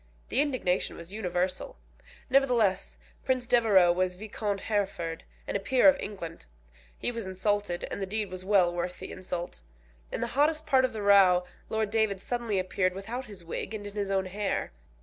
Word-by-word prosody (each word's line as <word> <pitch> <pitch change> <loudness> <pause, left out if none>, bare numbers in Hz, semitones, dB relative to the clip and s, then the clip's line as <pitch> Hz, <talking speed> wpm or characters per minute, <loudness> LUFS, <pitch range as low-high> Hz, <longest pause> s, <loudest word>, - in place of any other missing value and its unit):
The 265 - +3
indignation 255 -11 0
was 170 +3 -8
universal. 185 - -2 0.5
Nevertheless 250 -7 +2 0.3
Prince 255 -2 0
Devereux 215 -8 +5
was 180 +1 0
Viscount 205 0 -3
Hereford, 190 -6 -2 0.2
and - - -3
a - - +2
peer 255 +7 +4
of 285 - +8
England. 170 - -7 0.5
He - - -1
was 230 -4 -5
insulted, 190 -1 -1
and - - -4
the 195 - -2
deed 210 -1 -1
was 185 0 -6
well 185 -3 +4
worth 175 +1 -3
the 190 - -8
insult. 180 - -5 0.5
In - - -3
the - - +1
hottest 305 +3 +2
part 260 -1 +4
of 255 - -3
the 215 -2 -4
row 190 -3 +6 0.2
Lord 220 -2 -1
David 220 -3 +1
suddenly 235 -1 -2
appeared 185 0 0
without 230 +7 -5
his 200 -6 -10
wig 195 +5 -4
and 205 -1 -6
in 205 - -7
his 205 -1 -2
own 190 -1 +1
hair. 200 +2 -2
200 Hz, 180 wpm, -29 LUFS, 185-225 Hz, 0.5 s, of